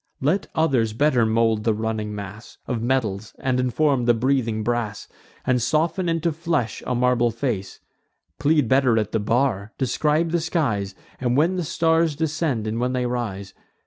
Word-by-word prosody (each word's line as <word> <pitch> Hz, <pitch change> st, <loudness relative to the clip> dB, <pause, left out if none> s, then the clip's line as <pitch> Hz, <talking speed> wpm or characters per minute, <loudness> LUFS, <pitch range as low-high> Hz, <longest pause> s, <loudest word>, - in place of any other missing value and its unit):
Let 165 Hz, +9 st, +1 dB
others 130 Hz, -9 st, +2 dB
better 125 Hz, -2 st, +3 dB
mould 110 Hz, -1 st, +2 dB
the 110 Hz, -1 st, +2 dB
running 110 Hz, -1 st, -3 dB
mass 100 Hz, +2 st, -9 dB
Of 120 Hz, -3 st, -2 dB
metals, 110 Hz, -5 st, -1 dB
and 130 Hz, -1 st, 0 dB
inform 130 Hz, +1 st, +1 dB
the 120 Hz, -1 st, +4 dB
breathing 115 Hz, -3 st, 0 dB
brass, 115 Hz, -3 st, -2 dB, 0.4 s
And 125 Hz, -1 st, +2 dB
soften 165 Hz, -, +1 dB
into 165 Hz, 0 st, 0 dB
flesh 160 Hz, -, -2 dB
a 125 Hz, -, 0 dB
marble 120 Hz, -1 st, +2 dB
face; 115 Hz, -5 st, -3 dB, 0.6 s
Plead 150 Hz, -3 st, +3 dB
better 130 Hz, -2 st, +3 dB
at 105 Hz, -2 st, 0 dB
the 110 Hz, -, 0 dB
bar; 110 Hz, -1 st, 0 dB
describe 150 Hz, +5 st, +1 dB
the 170 Hz, -1 st, +1 dB
skies, 115 Hz, -, -1 dB, 0.2 s
And 125 Hz, 0 st, 0 dB
when 165 Hz, +5 st, +3 dB
the 180 Hz, -, -1 dB
stars 160 Hz, 0 st, +1 dB
descend, 155 Hz, -6 st, -1 dB
and 110 Hz, +1 st, -2 dB
when 125 Hz, +1 st, 0 dB
they 125 Hz, -1 st, 0 dB
rise. 110 Hz, -6 st, -4 dB
125 Hz, 165 wpm, -23 LUFS, 110-150 Hz, 0.6 s, the